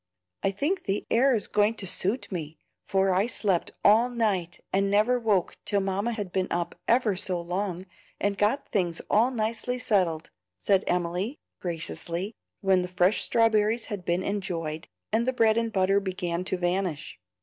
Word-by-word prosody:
"I - - +2
think 290 - -2
the 195 +1 -1
air 255 +2 +4
is 215 - -1
going 210 +2 +2
to 205 - -4
suit 195 +7 -1
me, 160 -4 -5 0.3
for 190 -1 +1
I 195 +4 +2
slept 200 -7 0 0.2
all 225 +4 +6
night 200 -8 -1
and 195 +1 +2
never 215 +5 +3
woke 210 -6 0
till 200 - +2
Mamma 195 +4 -1
had 205 -5 -5
been 185 0 0
up 175 0 -2
ever 230 -4 +3
so 185 -1 0
long 180 +1 -3 0.3
and 200 0 0
got 210 +7 +1
things 175 -5 0
all 225 +4 +4
nicely 235 +1 -1
settled," 185 -10 0 0.3
said 195 - +2
Emily, 180 - -1 0.2
graciously, 170 +3 -3 0.3
when 190 -2 +3
the 180 - -3
fresh 180 +2 +2
strawberries 225 0 +2
had 195 -3 -5
been 175 +2 0
enjoyed, 170 -6 -3 0.2
and 230 +3 +1
the 260 - +2
bread 225 -3 +3
and 230 0 0
butter 195 0 +3
began 180 -3 -3
to 185 - -1
vanish. 180 -3 -2
195 Hz, 170 wpm, -27 LUFS, 180-220 Hz, 0.3 s, all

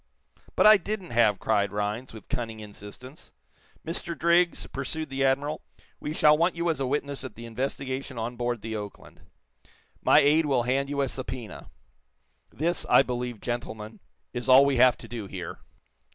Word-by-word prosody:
"But - - +4
I 215 0 +9
didn't 195 -1 -5
have," 115 -4 +3
cried 100 +1 +1
Rhinds, 105 +4 -3
with 110 -2 -12
cunning 115 -2 -4
insistence. 105 +6 -11 0.5
"Mr. 170 +1 -2
Driggs," 170 +1 +2
pursued 150 +3 -4
the 135 0 -1
admiral, 140 +3 +1 0.4
"we 150 - -4
shall 150 -1 +5
want 170 +3 +1
you 170 0 +1
as 160 - -4
a 135 - -1
witness 140 0 -1
at 130 -5 -8
the 115 - -9
investigation 130 +2 -4
on 115 +2 -3
board 120 -1 -2
the 110 +1 -5
'Oakland.' 105 -1 -9 0.8
My - - +5
aide 150 +2 +5
will 130 -4 +2
hand 135 +3 0
you 140 -1 -1
a 135 - +1
subpoena. 125 -4 -6 0.8
This, 170 +4 -1
I - - +7
believe, 125 -2 -4
gentlemen, 110 -3 -5 0.3
is 120 -1 -3
all 130 +2 +8
we 140 -2 +1
have 125 0 +6
to - - -11
do 115 -4 -6
here." 90 -3 -7
130 Hz, 170 wpm, -27 LUFS, 115-145 Hz, 0.8 s, I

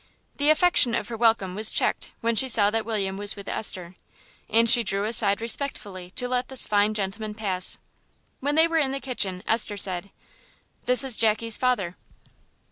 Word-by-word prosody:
The 290 +1 +1
affection 310 -7 +3
of - - -4
her 235 - -5
welcome 225 -5 +1
was 215 +3 +1
checked - - -1
when 230 0 -1
she 265 - +4
saw 210 -4 +3
that 225 0 -2
William 200 -4 -3
was 205 0 -1
with 200 -1 -11
Esther, 180 -4 0 0.5
and 230 +1 +2
she 235 +1 +6
drew 200 -1 -2
aside 210 -2 0
respectfully 205 -7 -2
to 250 - -1
let 250 0 -2
this 265 -2 +2
fine 210 +1 0
gentleman 210 +1 -4
pass. 190 -4 -2 0.6
When 290 +2 -2
they 320 +1 +4
were 330 -1 0
in 270 -3 -1
the 275 - -4
kitchen 200 -9 -3
Esther 220 -2 -1
said 185 0 +3 0.8
"This 250 +2 +5
is 260 -4 0
Jackie's 225 0 +1
father." 205 -9 -2
220 Hz, 180 wpm, -24 LUFS, 200-250 Hz, 0.8 s, she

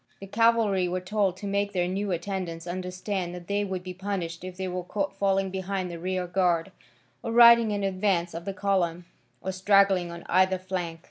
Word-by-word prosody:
The 195 - -8
cavalry 215 -3 +2
were 180 +1 -1
told 190 0 0
to 205 - -8
make 200 0 -1
their 175 -2 +1
new 195 +2 -2
attendants 175 -2 -4
understand 180 0 -4
that 175 -1 -9
they 205 0 0
would 190 -2 -4
be 185 0 -6
punished 180 -3 -4
if 185 -1 -7
they 190 0 -3
were 180 0 -3
caught 195 +2 -3
falling 195 -1 +1
behind 190 -1 -3
the 170 - -7
rear 185 +1 -2
guard, 175 -1 +1 0.5
or 230 - -4
riding 235 -1 +8
in 205 -1 -1
advance 190 -2 0
of 170 +1 -6
the 195 - -3
column, 180 -3 0 0.4
or 190 - -2
straggling 190 -1 +3
on 170 0 -8
either 185 +1 +3
flank. 180 -3 -4
185 Hz, 195 wpm, -27 LUFS, 180-200 Hz, 0.5 s, riding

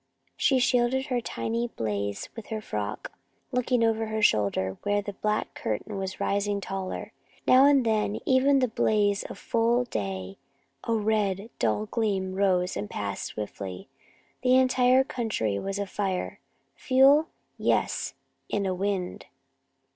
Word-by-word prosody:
She 265 - +3
shielded 250 +1 +2
her 250 -4 -1
tiny 230 +1 -2
blaze 100 - -3
with 225 -3 -8
her 220 -1 -3
frock, 105 - -4 0.4
looking 250 -1 +1
back 230 - +5
over 225 0 -1
her 220 0 -2
shoulder, 100 - +2
where 205 0 +1
the 205 0 -5
black 210 +2 -1
curtain 195 - -3
was 190 -1 -4
rising 200 0 0
taller. 195 -1 -5 0.3
Now 260 +2 +7
and 275 -3 +4
then, 215 -2 +1
even 260 +1 +3
in 280 -1 +5
the 255 - +3
blaze 205 -2 +1
of - - -8
full 235 +1 +1
day, 95 - -4 0.5
a 230 - +1
red, 210 -1 0
dull 110 -2 +1
gleam 195 - -1
rose 185 -2 +1
and 105 0 -4
passed 100 -1 -4
swiftly. 100 -3 -6 0.5
The 255 0 +4
entire 255 0 +4
country 215 - -2
was 195 0 -3
afire. 195 -2 -3 0.4
Fuel? 275 +4 +5 0.3
Yes; - - 0 0.4
and 200 -1 0
a 190 - 0
wind. 190 -1 -2
205 Hz, 145 wpm, -27 LUFS, 180-240 Hz, 0.5 s, Now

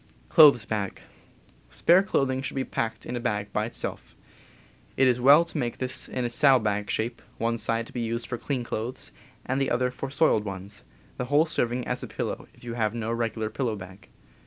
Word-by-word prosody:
Spare 175 +3 +4
clothing 135 -9 0
should 135 +1 -5
be 135 - 0
packed 110 -3 -3
in 125 - -4
a - - -2
bag 105 -3 -2
by 105 - 0
itself. 115 - -6 0.8
It 135 - +5
is 125 -1 +2
well 145 +6 +7
to 170 - -6
make 120 -3 -2
this 130 0 -1
in 125 -1 -2
saddle 135 +1 +5
bag 105 -3 -1
shape, 115 +2 -2 0.2
one 115 0 -1
side 115 +1 +1
n - - -16
th - - -29
"R - - -1
^^ - - -1
^^ - - -2
used 115 +1 -2
for 120 - -5
clean 130 -4 -2
clothes 120 +2 -4 0.3
and 130 +2 -1
the 135 - +1
other 125 +1 +1
for 135 +2 -5
soiled 140 -6 +3
ones, 100 +2 -7 0.3
the 125 - -2
whole 145 +5 +4
serving 125 -5 -1
as - - -2
a - - -6
pillow - - -4
if - - -20
you 120 -1 -5
have 110 -1 -1
no 115 -1 -2
regular 115 -2 -2
pillow 120 -5 -1
bag. 95 0 -11
120 Hz, 205 wpm, -26 LUFS, 110-130 Hz, 0.8 s, well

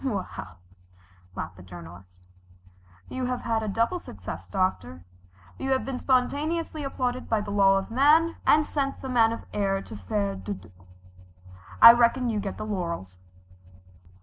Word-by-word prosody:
"Well," 210 -8 -1 1.1
laughed 90 -3 -6
the - - -12
Journalist, 90 +1 -13 0.8
"you 260 -1 -4
have 250 0 -2
had 225 -1 -1
a 215 - -3
double 230 - 0
success, - - -9
Doctor. 95 - -2 0.6
You 270 - -3
have 260 - -1
been 265 -2 -4
spontaneously 295 +5 0
applauded 255 -2 -3
by 220 -2 +1
the 205 -1 -6
man 195 -1 +4
of 195 - -14
law, 305 +7 +4
and 300 0 +5
sent 275 -2 -3
the 265 - -4
man 230 -3 +4
of 230 - -5
the - - -16
air 195 -1 +1
to 110 - -10
faire 100 0 -2
dodo. 95 -1 -7 1.1
I 230 - +13
reckon 240 +1 +2
you 215 - -1
get 195 -1 -5
the - - -5
laurels." 170 - -4
215 Hz, 155 wpm, -26 LUFS, -, 1.1 s, I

